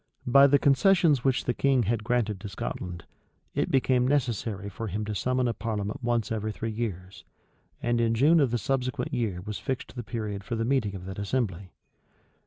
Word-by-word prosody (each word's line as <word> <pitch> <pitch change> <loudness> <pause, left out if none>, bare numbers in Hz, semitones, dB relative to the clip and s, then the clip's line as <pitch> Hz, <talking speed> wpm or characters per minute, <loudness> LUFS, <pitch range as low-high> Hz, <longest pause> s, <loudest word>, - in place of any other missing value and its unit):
By 140 +3 +7
the 140 +1 +5
concessions 150 - +4
which 135 -2 +1
the 120 - +1
king 135 -2 +2
had 110 +1 -1
granted 110 -4 0
to 105 +1 -7
Scotland, 90 -3 -5 0.5
it - - 0
became 130 -1 +2
necessary 115 -7 -1
for 110 +3 -5
him 105 +2 -3
to 105 - -3
summon 125 +4 0
a 120 - 0
parliament 105 0 -4
once 120 -3 0
in 110 -1 -2
three 110 +1 -4
years; 95 -5 -5 0.6
and 120 0 +1
in 115 0 +2
June 150 +8 +5
of 140 -4 +3
the 120 - 0
subsequent 130 +2 -2
year 110 -8 -1
was 105 +2 -5
fixed 130 0 -4
the 125 - -4
period 105 -3 -4
for 115 - -3
the 115 0 -1
meeting 115 -6 0
of 90 -1 -8
that 95 +1 -6
assembly. 100 -4 -2
115 Hz, 190 wpm, -27 LUFS, 105-130 Hz, 0.6 s, By